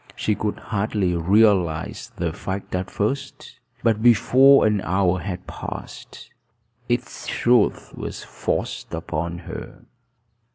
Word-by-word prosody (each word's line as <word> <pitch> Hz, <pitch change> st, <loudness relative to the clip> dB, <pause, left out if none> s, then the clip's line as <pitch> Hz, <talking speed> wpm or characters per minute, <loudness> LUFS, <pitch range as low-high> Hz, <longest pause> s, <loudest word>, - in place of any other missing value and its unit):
She 110 Hz, -, 0 dB
could 105 Hz, 0 st, -2 dB
hardly 100 Hz, -4 st, -1 dB
realize 90 Hz, -2 st, +2 dB
the 85 Hz, -2 st, -2 dB
fact 95 Hz, +3 st, -5 dB
at 90 Hz, 0 st, -2 dB
first; 130 Hz, +7 st, -4 dB, 0.2 s
but 110 Hz, -2 st, +2 dB
before 130 Hz, +4 st, +6 dB
an 105 Hz, -2 st, +2 dB
hour 95 Hz, 0 st, +1 dB
had 90 Hz, -1 st, -5 dB
passed, -, -, -8 dB, 0.6 s
its -, -, -2 dB
truth 120 Hz, -3 st, +2 dB
was -, -, -6 dB
forced -, -, -3 dB
upon 85 Hz, +2 st, -3 dB
her. -, -, -8 dB
100 Hz, 115 wpm, -23 LUFS, 90-110 Hz, 0.6 s, before